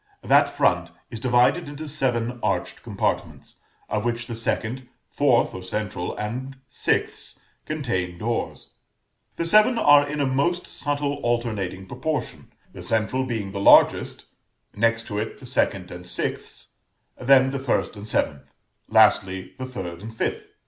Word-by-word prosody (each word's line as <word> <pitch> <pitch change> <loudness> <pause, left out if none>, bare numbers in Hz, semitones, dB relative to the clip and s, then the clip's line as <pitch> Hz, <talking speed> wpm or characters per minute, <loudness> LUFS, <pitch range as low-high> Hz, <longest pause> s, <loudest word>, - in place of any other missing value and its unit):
That - - +5
front - - +1 0.2
is 115 - -6
divided 125 +7 +2
into 150 +2 -7
seven 125 -4 -1
arched 90 -3 -2
compartments, - - -3 0.3
of 105 - -2
which 120 0 -2
the 120 - -6
second, 115 +2 -2 0.2
fourth 135 -5 +2
or 95 - -6
central, 95 -1 -4
and 125 +6 -5
sixth - - -2 0.3
contain 95 - -2
doors; 115 +5 -4 0.6
the 170 - -2
seven 215 +7 +5
are 145 -6 +5
in 150 0 -3
a 140 - +2
most 140 +7 0
subtle 145 -1 -2
alternating 110 -6 -2
proportion; 130 +9 -4 0.2
the - - -9
central 115 +4 0
being 110 -6 -3
the 100 - -4
largest, - - +5 0.5
next 115 +1 +1
to 105 -1 -3
it 110 - -4
the 130 - -12
second 100 -7 0
and 90 0 -9
sixth, - - -4 0.5
then 130 +1 +5
the 140 - -3
first 130 -3 -1
and 105 +1 -8
seventh, 70 -9 -1 0.4
lastly 95 -4 +3
the 130 - -4
third 95 -9 -6
and 110 +2 -9
fifth. - - -3
120 Hz, 145 wpm, -24 LUFS, 105-135 Hz, 0.6 s, That